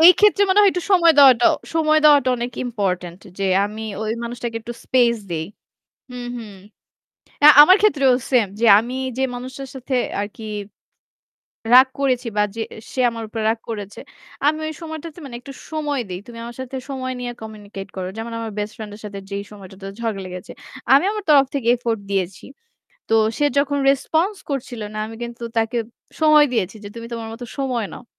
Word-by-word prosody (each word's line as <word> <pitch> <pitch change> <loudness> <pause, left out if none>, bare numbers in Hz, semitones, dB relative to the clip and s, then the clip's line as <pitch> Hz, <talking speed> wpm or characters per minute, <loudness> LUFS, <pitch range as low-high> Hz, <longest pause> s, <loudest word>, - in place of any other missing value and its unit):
এই 340 +3 +10
ক্ষেত্রে 415 -1 +5
মনে 380 +2 +3
হয় 405 - +6
একটু 360 - -3
সময় 340 -3 +6
দেওয়াটা 260 -4 +7 0.3
সময় 310 -1 +3
দেওয়াটা 290 -4 +6
অনেক 240 +1 -4
ইম্পোর্টেন্ট 185 -6 -3 0.2
যে 195 - -1 0.2
আমি 215 +2 -6 0.2
ওই 215 - -2
মানুষটাকে 235 0 -5
একটু 235 +2 -7
স্পেস 240 -2 +3
দেই। 160 -1 -2 0.7
হুম, 245 -1 -6
হুম, 220 -4 -9 0.9
আ - - +11 0.2
আমার 370 +5 +7
ক্ষেত্রেও 280 -11 +4 0.2
সেম 245 -5 +4
যে 235 - +3
আমি 240 +3 -3 0.2
যে - - +1
মানুষটার 260 +2 -7
সাথে 265 0 -5 0.3
আরকি 205 +2 -6 1.3
রাগ 260 +1 +9
করেছি 255 -3 0
বা 210 - +4
যে 230 - -3 0.3
সে - - -5
আমার 230 -1 -6
উপর 225 +1 -6
রাগ 225 0 -1
করেছে। 205 -3 -6 0.5
আমি 305 +1 +3
ওই 315 - -4
সময়টাতে 315 0 -8
মানে 245 -3 -8
একটু 275 +2 -10 0.2
সময় 295 -3 -2
দেই। 180 0 -5
তুমি 235 -1 -10
আমার 235 +1 -8
সাথে 260 +1 -7
সময় 260 -1 -4
নিয়ে 245 -1 -4
কমিউনিকেট 205 -3 -9
করো। 185 -1 -4
যেমন 225 +1 -5
আমার 225 -1 -5
বেস্ট 210 +1 -4
ফ্রেন্ড 215 -2 -8
এর 210 - -15
সাথে 200 -1 -7
যেই 200 0 -4
সময়টাতে 195 -1 -12 0.2
ঝগড়া 220 -4 -2
লেগেছে। 180 0 -8 0.4
আমি 275 - +6
আমার 425 -1 -4
তরফ 280 -2 +7
থেকে 260 -5 -2
এফোর্ট 230 -2 -2
দিয়েছি। 190 -1 -2 0.7
তো - - -3 0.3
সে 295 - +2
যখন 285 0 +1
রেসপন্স 320 +8 0 0.2
করছিল 250 -4 -4
না - - -4
আমি 225 - -9
কিন্তু 235 0 -7
তাকে 225 +2 0 0.4
সময় 305 -1 +6
দিয়েছি 215 -3 -1
যে - - -6
তুমি 230 0 -7
তোমার 230 -1 -5
মত 230 +2 -9 0.2
সময় 250 -5 -1
নাও। - - -11
240 Hz, 185 wpm, -21 LUFS, 215-280 Hz, 1.3 s, আ